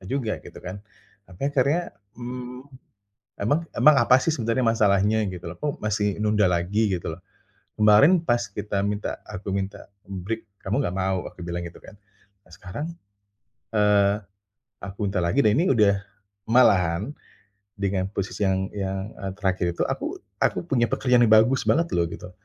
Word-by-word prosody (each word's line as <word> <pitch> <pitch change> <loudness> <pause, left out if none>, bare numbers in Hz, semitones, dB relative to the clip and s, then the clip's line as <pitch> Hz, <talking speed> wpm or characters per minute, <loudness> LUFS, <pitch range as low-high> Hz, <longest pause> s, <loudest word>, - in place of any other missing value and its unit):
enggak 95 - -11
juga 125 -6 -1
gitu - - -11
kan. 90 +2 -7 0.5
Sampai 95 +7 -7
akhirnya, 145 +6 +2 0.4
mmm, 125 +1 -6 0.8
"Emang 145 +10 +2 0.2
emang 150 -1 +6
apa 120 +2 +6
sih - - +1
sebenarnya 115 0 0
masalahnya? 110 -1 +3
Gitu 90 -2 -7
loh. 85 - -9
Kok 145 -1 -3
masih 105 -1 0
nunda 105 -1 +3
lagi? 95 +4 +1
Gitu 85 - -5
loh. 80 - -8 0.6
Kemarin 105 - +6
pas 120 -9 +1
kita 105 -1 -3
minta 105 0 -3
aku 100 -1 -6
minta 100 0 -4 0.2
break, 100 +4 -5 0.2
kamu 95 +2 0
enggak 90 - -2
mau," 95 -1 -1
aku - - -14
bilang 85 0 -3
gitu 85 - -10
kan. 105 - -13 0.5
Nah - - -23
sekarang, 100 +10 -6 0.9
eee, 105 -1 +4 0.7
aku 100 0 -7
minta 95 - -3
lagi 85 +10 +1
dan 105 - +5
ini 170 +4 +2
udah 105 -3 +4 0.5
malahan 100 -4 +4 0.7
dengan 95 -1 0
posisi 100 0 -3
yang 95 0 0
yang, 95 0 -3
eee, 95 -1 -4
terakhir 95 -3 0
itu - - 0
aku - - -3 0.2
aku - - +1
punya 125 -7 +2
pekerjaan 125 -2 +3
yang 110 - +2
bagus 115 +5 +5
banget 165 +2 +2
loh 85 -1 +2
gitu. 90 - -9
105 Hz, 165 wpm, -24 LUFS, 95-120 Hz, 0.9 s, emang